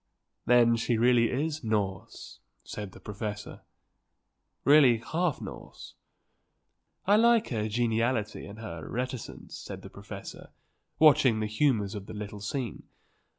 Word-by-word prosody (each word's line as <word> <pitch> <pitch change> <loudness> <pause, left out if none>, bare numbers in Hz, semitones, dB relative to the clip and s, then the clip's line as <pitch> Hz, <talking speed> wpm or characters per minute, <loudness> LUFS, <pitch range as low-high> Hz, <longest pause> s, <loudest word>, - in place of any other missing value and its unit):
"Then 120 -1 +5
she 115 0 0
really 120 0 +4
is 150 +3 -2
Norse," 100 -4 -3 0.2
said 105 -3 -7
the - - -13
professor. 105 0 -6 1.0
"Really 140 -5 +7
half 160 +7 -1
Norse." - - -10 1.1
"I 200 - +5
like 230 0 +4
her 110 -3 -2
geniality 115 -1 0
and 100 +1 -10
her 85 -8 -7
reticence," 125 -1 -5
said - - -8
the - - -10
professor, - - -9 0.5
watching 135 -7 +5
the 110 - -1
humours 105 -2 +1
of 100 -2 -7
the - - -8
little 105 -1 -7
scene. 120 +2 -4
115 Hz, 125 wpm, -29 LUFS, 105-130 Hz, 1.1 s, Really